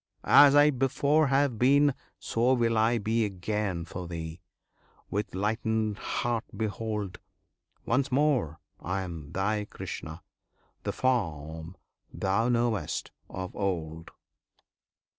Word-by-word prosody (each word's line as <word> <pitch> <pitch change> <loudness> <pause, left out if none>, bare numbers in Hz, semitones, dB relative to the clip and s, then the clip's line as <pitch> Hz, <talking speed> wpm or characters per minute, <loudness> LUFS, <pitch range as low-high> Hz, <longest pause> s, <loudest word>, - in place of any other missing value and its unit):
As 145 -1 +8
I 145 +1 +7
before 140 +3 +2
have 135 -4 +2
been 140 +3 +5 0.2
So 120 +3 +1
will 115 -2 +1
I 110 +2 +3
be 110 +2 +1
again 100 -2 -2
for 90 0 -7
thee; 80 0 -6 0.7
with 100 -2 -2
lightened 110 +1 -1
heart 120 -2 -1
behold! 105 -3 -3 0.7
Once 130 +3 +1
more 130 - +1 0.2
I 95 +2 -2
am 80 -5 -8
thy 105 +3 -1
Krishna, 80 -3 -7 0.6
the - - -2
form 80 - -2 0.3
thou 100 +5 0
knew'st 115 -8 0 0.2
of 95 -1 -6
old! 80 -5 -3
110 Hz, 110 wpm, -28 LUFS, 90-120 Hz, 0.7 s, As